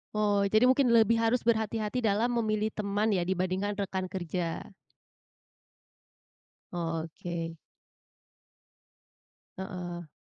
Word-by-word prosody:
Oh. 205 Hz, -1 st, +2 dB
Jadi 215 Hz, +3 st, +4 dB
mungkin 260 Hz, +1 st, +5 dB
lebih 230 Hz, 0 st, +5 dB
harus 230 Hz, +2 st, +2 dB
berhati-hati 220 Hz, 0 st, 0 dB
dalam 225 Hz, +1 st, +2 dB
memilih 215 Hz, -1 st, 0 dB
teman 210 Hz, +1 st, 0 dB
ya 180 Hz, -3 st, +1 dB
dibandingkan 190 Hz, +2 st, 0 dB
rekan 190 Hz, -2 st, -2 dB
kerja. 175 Hz, -2 st, -3 dB, 2.1 s
Oh, 165 Hz, -2 st, -2 dB
oke. 165 Hz, 0 st, -5 dB, 2.0 s
Heeh. 180 Hz, -3 st, -6 dB
200 Hz, 95 wpm, -29 LUFS, 180-220 Hz, 2.1 s, mungkin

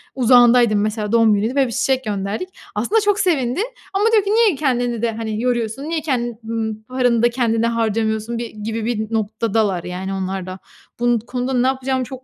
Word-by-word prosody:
Uzağındaydım 240 Hz, -3 st, +5 dB
mesela 215 Hz, 0 st, -2 dB
doğum 225 Hz, -2 st, +4 dB
günüydü 220 Hz, +6 st, -1 dB
ve 270 Hz, -2 st, +3 dB
1 -, -, -6 dB
çiçek 265 Hz, +1 st, 0 dB
gönderdik. 205 Hz, -, -3 dB, 0.3 s
Aslında 410 Hz, -, +1 dB
çok 410 Hz, 0 st, +1 dB
sevindi 285 Hz, -7 st, +1 dB, 0.3 s
ama 405 Hz, +3 st, +1 dB
diyor 425 Hz, -3 st, +5 dB
ki 400 Hz, -, -3 dB
"Niye 440 Hz, -6 st, +4 dB
kendini 245 Hz, -5 st, 0 dB
de, 230 Hz, -, +1 dB
hani, 220 Hz, 0 st, -4 dB
yoruyorsun? 240 Hz, +1 st, -1 dB
Niye 320 Hz, 0 st, -2 dB
ken 240 Hz, -6 st, -2 dB
n 220 Hz, -1 st, -3 dB
paranı 245 Hz, -2 st, +1 dB
da 240 Hz, -, +5 dB
kendine 230 Hz, -2 st, +1 dB
harcamıyorsun?" 225 Hz, 0 st, -1 dB
bir 235 Hz, -1 st, -4 dB
gibi 220 Hz, +1 st, -5 dB
bir 220 Hz, -1 st, -2 dB
noktadalar 215 Hz, -3 st, 0 dB
yani 185 Hz, +2 st, -4 dB
onlar 190 Hz, -1 st, -3 dB
da. 185 Hz, 0 st, -7 dB, 0.4 s
Bu 240 Hz, 0 st, +3 dB
n -, -, 0 dB
konuda 250 Hz, +3 st, -4 dB
ne 250 Hz, +1 st, +2 dB
yapacağımı 265 Hz, 0 st, -1 dB
çok 260 Hz, 0 st, -9 dB
235 Hz, 190 wpm, -20 LUFS, 220-260 Hz, 0.4 s, Uzağındaydım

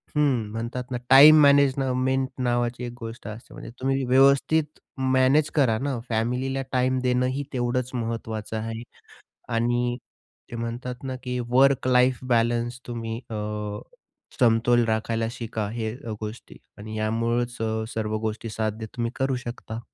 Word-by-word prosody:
हं. 135 Hz, -8 st, +1 dB
म्हणतात 120 Hz, +3 st, -5 dB
ना 125 Hz, -, -1 dB
टाईम 145 Hz, +4 st, +9 dB
मॅनेजमेंट 135 Hz, -2 st, +3 dB
नावाची 120 Hz, -1 st, 0 dB
एक 120 Hz, -, -4 dB
गोष्ट 115 Hz, +1 st, -8 dB
असते. 110 Hz, +2 st, -9 dB
म्हणजे -, -, -9 dB
तुम्ही 135 Hz, +1 st, 0 dB
व्यवस्थित 140 Hz, +4 st, +3 dB, 0.3 s
मॅनेज 130 Hz, +4 st, +4 dB
करा 130 Hz, -7 st, +3 dB
ना, 140 Hz, -1 st, -2 dB
फॅमिलीला 125 Hz, +4 st, -1 dB
टाईम 130 Hz, 0 st, +1 dB
देणंही 125 Hz, +2 st, +1 dB
तेवढंच 125 Hz, 0 st, -1 dB
महत्त्वाचं 115 Hz, -2 st, -4 dB
आहे. 115 Hz, +1 st, -4 dB, 0.7 s
आणि 120 Hz, +1 st, 0 dB, 0.5 s
ते 120 Hz, -, -5 dB
म्हणतात 120 Hz, +2 st, -4 dB
ना, 130 Hz, -1 st, -3 dB
की 125 Hz, 0 st, -3 dB
वर्क 135 Hz, +1 st, +4 dB
लाइफ 125 Hz, 0 st, +4 dB, 0.2 s
बॅलन्स 120 Hz, +1 st, 0 dB
तुम्ही 115 Hz, -2 st, -4 dB
अ, -, -, -4 dB, 1.1 s
समतोल 120 Hz, 0 st, +4 dB
राखायला 115 Hz, +1 st, 0 dB
शिका. 110 Hz, -3 st, -4 dB
हे 110 Hz, -1 st, -3 dB, 0.3 s
गोष्टी 110 Hz, +2 st, -8 dB, 0.2 s
आणि 110 Hz, +1 st, -7 dB
यामुळंच 115 Hz, +3 st, -1 dB
स -, -, -5 dB, 0.3 s
सर्व 110 Hz, -1 st, -1 dB
गोष्टी 110 Hz, +1 st, -3 dB
साध्य 110 Hz, 0 st, -3 dB
तुम्ही 120 Hz, -1 st, -1 dB
करू 135 Hz, -1 st, 0 dB
शकता. 120 Hz, -2 st, -6 dB
120 Hz, 135 wpm, -25 LUFS, 115-130 Hz, 1.1 s, टाईम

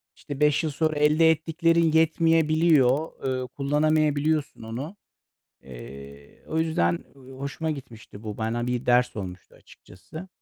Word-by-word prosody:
işte, 145 Hz, -2 st, -8 dB
5 150 Hz, +1 st, +3 dB
yıl 155 Hz, -, -1 dB
sonra 155 Hz, +2 st, 0 dB
elde 155 Hz, +2 st, +5 dB
ettiklerin 165 Hz, +1 st, +1 dB
yetmeyebiliyor. 160 Hz, -3 st, +3 dB, 0.3 s
Eee, 125 Hz, -, -5 dB
kullanamayabiliyorsun 150 Hz, +1 st, 0 dB
onu. 130 Hz, -, -6 dB, 0.7 s
Eee, 70 Hz, +2 st, -12 dB
o 160 Hz, -, -3 dB
yüzden 85 Hz, -, +1 dB, 0.4 s
hoşuma 145 Hz, +4 st, -3 dB
gitmişti 115 Hz, -6 st, -10 dB
bu. 105 Hz, -2 st, -6 dB
Bana 115 Hz, +2 st, -2 dB
bir 125 Hz, 0 st, -2 dB
ders 125 Hz, 0 st, +3 dB
olmuştu 95 Hz, -3 st, -8 dB
açıkçası. 155 Hz, -, -13 dB
145 Hz, 120 wpm, -25 LUFS, 115-160 Hz, 0.7 s, elde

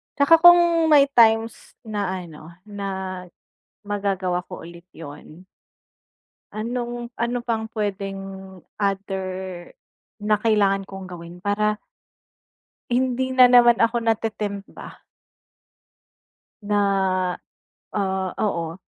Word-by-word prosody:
At 285 Hz, -, +2 dB
saka 330 Hz, +4 st, +7 dB
kung 345 Hz, -2 st, +6 dB
may 280 Hz, -2 st, +7 dB
times 225 Hz, -2 st, +2 dB
na 210 Hz, -3 st, -3 dB
ano 160 Hz, -2 st, -12 dB
na 190 Hz, -3 st, -5 dB, 0.6 s
magagawa 195 Hz, -3 st, -2 dB
ko -, -, -9 dB
ulit 170 Hz, +1 st, -12 dB
yun. 160 Hz, +3 st, -12 dB, 1.1 s
Anong, 240 Hz, +2 st, -5 dB
ano 235 Hz, +1 st, -2 dB
pang 220 Hz, -2 st, -2 dB
pwedeng 195 Hz, -2 st, -3 dB, 0.6 s
other 190 Hz, -2 st, -3 dB, 0.5 s
na 210 Hz, 0 st, 0 dB
kailangan 205 Hz, -3 st, +2 dB
kong 195 Hz, -1 st, -8 dB
gawin 175 Hz, -1 st, -10 dB
para, 210 Hz, +1 st, +1 dB, 1.1 s
hindi 260 Hz, +1 st, 0 dB
na 255 Hz, -1 st, +7 dB
naman 240 Hz, -1 st, +6 dB
ako 230 Hz, 0 st, +2 dB
natetempt 210 Hz, -3 st, -2 dB
ba, -, -, -11 dB, 1.7 s
na, 205 Hz, 0 st, 0 dB, 1.2 s
ah, 190 Hz, -2 st, -1 dB
oo 170 Hz, -5 st, -2 dB
205 Hz, 100 wpm, -23 LUFS, 190-235 Hz, 1.7 s, saka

